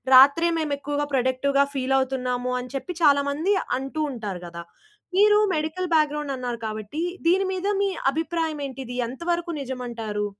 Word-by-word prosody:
రాత్రే 285 +6 +7
మేము 300 -2 -1
ఎక్కువగా 290 +1 -2
ప్రొడక్టివ్‌గా 265 +2 +2
ఫీల్ 270 0 +1
అవుతున్నాము 250 -1 -1
అని 250 +1 -7
చెప్పి 345 +6 -4
చాలా 285 -1 +6
మంది 320 +8 +1 0.3
అంటూ 270 +3 -5
ఉంటారు 205 -7 -5
కదా! 170 0 -8 0.5
మీరు 415 +2 +6 0.2
మెడికల్ 315 +4 -2
బ్యాక్‌గ్రౌండ్ 300 -2 +1
అన్నారు 245 -2 -4
కాబట్టి 215 +7 -5 0.3
దీని 380 +3 +4
మీద 375 +2 -2 0.2
మీ 400 - +2 0.2
అభిప్రాయం 320 0 -2
ఏంటి? 265 0 -8
ఇది 245 - -6
ఎంతవరకు 340 +7 -2
నిజమంటారు? 235 -5 -4
280 Hz, 150 wpm, -24 LUFS, 250-320 Hz, 0.5 s, రాత్రే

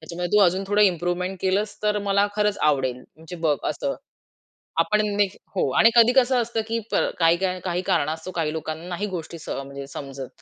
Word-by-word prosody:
त्याच्यामध्ये 175 +4 -2
तू 210 - +6
अजून 185 +2 +1
थोडं 205 +1 +3
इम्प्रूव्हमेंट 180 0 0
केलंस 200 +3 0
तर 210 0 +1
मला 200 +1 +3
खरंच 210 -1 +1
आवडेल. 130 -4 +1 0.2
म्हणजे 160 +2 -10
बघ 150 -2 +3
असं." 275 - -2 0.9
आपण 210 0 +3 0.2
ने 205 - +5 0.3
हो 180 - +1
आणि 225 - +7
कधी 235 0 +7
कसं 255 -1 +4
असतं, 230 -1 -2
की 230 +1 -1
प - - 0 0.2
काही 180 +1 +1
कारण 150 -5 +1
असतो 160 +3 -5
काही 165 -3 -1
लोकांना 160 +1 -5
नाही 180 +3 -3
गोष्टी 170 0 -6
म्हणजे 140 0 -6
सह 140 - -7
समजत. 135 -1 -8
180 Hz, 185 wpm, -24 LUFS, 160-210 Hz, 0.9 s, आणि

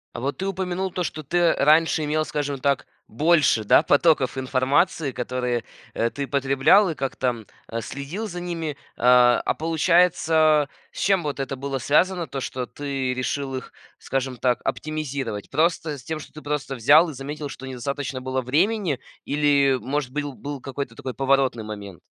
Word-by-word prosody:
А - - -4
вот 140 +3 -2
ты 190 - -3
упомянул 190 0 -2
то, 180 - -2
что 155 - -4
ты 170 +3 +2
раньше 155 +2 +3
имел, 155 +1 0
скажем 145 -2 -3
так, 140 0 0 0.2
больше, 150 -2 +3
да, 105 - +5
потоков 145 -4 +3
информации, 135 +4 +1
которые, 125 -1 -2 0.3
э, 115 - 0
ты 140 +3 -5
потреблял 140 +9 +4
и 160 - -3
как-то, 125 -4 -2 0.2
а, 115 0 -4
следил 145 - -5
за 180 -3 -6
ними, 165 -4 -4 0.2
а, 125 0 +5
а - - +2
получается, 160 -2 +3 0.2
с - - -9
чем 195 -3 +2
вот 145 -2 -3
это 135 0 -3
было 135 +1 -3
связано 170 +6 +2
то, 135 +1 -5
что 130 -1 -4
ты 135 -3 -3
решил 135 +1 -2
их, 130 - -7 0.3
скажем 130 -1 -3
так, 125 0 +1
оптимизировать? 140 -8 -3
Просто 155 0 0
с 125 - -13
тем, 160 +2 -4
что - - -12
ты 155 - -10
просто 145 -2 -3
взял 150 +8 +5
и - - -6
заметил, 145 +3 -6
что 135 - -9
недостаточно 130 +1 -4
было 130 0 -2
времени, 165 - +1 0.3
или, 140 -2 +3
может 135 0 -3
быть, 145 +2 -2
был 145 0 -6
какой-то 135 -3 -5
такой 130 -1 -6
поворотный 135 -3 +1
момент? 100 -5 -8
140 Hz, 170 wpm, -24 LUFS, 130-155 Hz, 0.3 s, да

